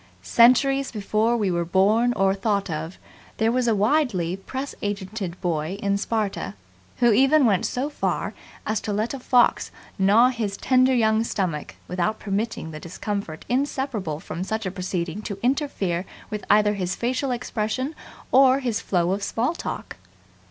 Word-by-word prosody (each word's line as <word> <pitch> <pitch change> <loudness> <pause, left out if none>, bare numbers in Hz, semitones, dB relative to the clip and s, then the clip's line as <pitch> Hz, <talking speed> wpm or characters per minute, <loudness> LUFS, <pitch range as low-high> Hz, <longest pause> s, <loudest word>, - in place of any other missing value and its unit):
Centuries 270 +3 +4
before 215 +2 +1
we 205 -4 0
were 170 0 0
born 205 +7 +3
or 195 -2 +2
thought 200 -2 -1
of 160 +3 -5 0.4
there 225 0 +2
was 250 0 +1
a 225 - +3
widely 205 - +1
press 265 +8 -6
agented 200 -2 -4
boy 165 +1 -1
in 200 -2 0
Sparta 200 - -2 0.4
who 240 -1 +4
even 270 +6 +5
went 200 -5 +2
so 255 +3 -2
far 295 - -2 0.3
as 215 -1 -1
to 210 - -3
let 215 +5 -1
a 275 - -5
fox 245 -1 +3 0.3
gnaw 210 +6 +5
his 220 -5 -3
tender 255 0 +3
young 220 -1 +3
stomach 180 -9 -3
without 185 +4 -1
permitting 200 -4 -3
the 155 - -7
discomfort 180 -1 -5
inseparable 250 - -1
from 170 - -5
such 220 +2 -3
a 185 - -2
proceeding 185 0 -3
to 200 -2 -5
interfere 240 - 0 0.3
with 210 -1 -4
either 210 0 +5
his 190 -2 -2
facial 255 +3 -1
expression 245 +2 -2 0.4
or 265 0 +6
his 245 -6 -2
flow 175 -2 +1
of 200 +2 -1
small 235 +9 0
talk. - - -6
215 Hz, 160 wpm, -24 LUFS, 190-245 Hz, 0.4 s, or